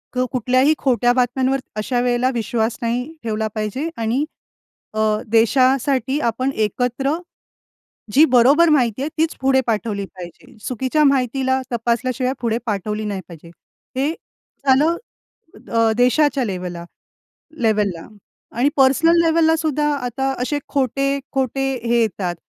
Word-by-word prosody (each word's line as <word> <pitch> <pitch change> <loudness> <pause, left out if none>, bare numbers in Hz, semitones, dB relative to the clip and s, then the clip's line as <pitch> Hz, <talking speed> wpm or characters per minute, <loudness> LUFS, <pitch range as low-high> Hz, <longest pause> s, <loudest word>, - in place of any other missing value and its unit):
तर 255 0 +1
कुठल्याही 255 +4 +2
खोट्या 245 -2 +2
बातम्यांवर 260 +2 +1 0.2
अशा 240 +4 -1
वेळेला 245 +1 +1
विश्वास 230 0 -1
नाही 235 +1 -1 0.2
ठेवला 220 -1 -1
पाहिजे. 215 +9 -3
आणि 235 +6 0 0.7
अ, 215 - -3 0.3
देशासाठी 260 +4 +2
आपण 255 +4 -2
एकत्र 250 +5 -2 1.0
जी 295 +4 +7
बरोबर 280 +7 +5
माहिती 255 -5 +2
आहे 295 - -2
तीच 320 +1 0
पुढे 265 0 +3
पाठवली 210 -3 -1
पाहिजे. 180 +3 -13
चुकीच्या 260 +5 0
माहितीला 260 0 +1
तपासल्याशिवाय 250 +2 -1
पुढे 230 -1 0
पाठवली 210 0 -3
नाही 200 -2 -3
पाहिजे. 165 0 -12 0.5
हे 285 +4 +1 0.6
झालं 300 +6 +4 0.8
अ, 225 -1 +3
देशाच्या 265 +1 +3
लेवला 180 -3 -5 0.8
लेव्हलला. 205 -6 0 0.4
आणि 255 +5 +1
पर्सनल 310 +6 +4
लेवललासुद्धा 320 -2 +2
आता 265 +1 -2
असे 290 +3 -1
खोटे-खोटे 275 0 -1 0.2
हे 235 0 +2
येतात, 185 -5 -2
250 Hz, 115 wpm, -20 LUFS, 225-275 Hz, 1.0 s, जी